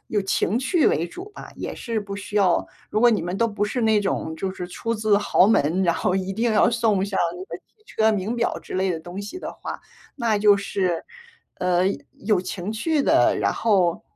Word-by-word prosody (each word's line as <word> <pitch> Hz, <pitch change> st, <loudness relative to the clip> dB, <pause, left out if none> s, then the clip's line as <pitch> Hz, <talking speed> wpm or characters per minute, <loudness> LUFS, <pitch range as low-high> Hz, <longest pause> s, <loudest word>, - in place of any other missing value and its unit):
有 210 Hz, -, 0 dB
情 195 Hz, +2 st, 0 dB
趣 295 Hz, +6 st, +2 dB
为 165 Hz, +3 st, +2 dB
主 365 Hz, -, -9 dB
吧， -, -, -10 dB
也 -, -, -5 dB
是 230 Hz, -2 st, -3 dB
不 200 Hz, -1 st, -6 dB
需 200 Hz, +1 st, -9 dB
要 190 Hz, -4 st, +3 dB, 0.2 s
如 215 Hz, -, -1 dB
果 240 Hz, +1 st, +6 dB
你 220 Hz, -, +1 dB
们 180 Hz, +2 st, -3 dB
都 230 Hz, -, +2 dB
不 205 Hz, -2 st, -4 dB
是 235 Hz, +4 st, -2 dB
那 220 Hz, -1 st, +3 dB
种 190 Hz, -5 st, -2 dB
就 190 Hz, +4 st, -3 dB
是 180 Hz, -1 st, -6 dB
出 230 Hz, +5 st, -3 dB
自 215 Hz, -1 st, +2 dB
豪 200 Hz, -2 st, +4 dB
门， 185 Hz, -3 st, +2 dB
然 170 Hz, -2 st, +2 dB
后 180 Hz, -, 0 dB
一 190 Hz, 0 st, -2 dB
定 230 Hz, +4 st, 0 dB
要 210 Hz, -, +5 dB
送 225 Hz, -5 st, +1 dB
上 200 Hz, -1 st, -3 dB, 0.2 s
那 180 Hz, -, -7 dB
个 -, -, -7 dB
汽 -, -, -38 dB, 0.2 s
车、 220 Hz, -, +2 dB
名 210 Hz, +2 st, -1 dB
表 235 Hz, -1 st, -1 dB
之 -, -, -12 dB
类 185 Hz, -3 st, 0 dB
东 175 Hz, +4 st, -8 dB
西 205 Hz, -, -7 dB
的 -, -, -6 dB
话， -, -, -7 dB, 0.4 s
那 230 Hz, -5 st, +1 dB
就 205 Hz, -1 st, +5 dB
是， 185 Hz, -4 st, -2 dB, 0.5 s
呃， 180 Hz, -1 st, +2 dB, 0.4 s
有 210 Hz, -4 st, +3 dB
情 185 Hz, +2 st, -5 dB
趣 295 Hz, +7 st, 0 dB
的， -, -, +4 dB
然 -, -, +1 dB
后 185 Hz, -6 st, +1 dB
205 Hz, 235 characters per minute, -23 LUFS, 185-225 Hz, 0.5 s, 果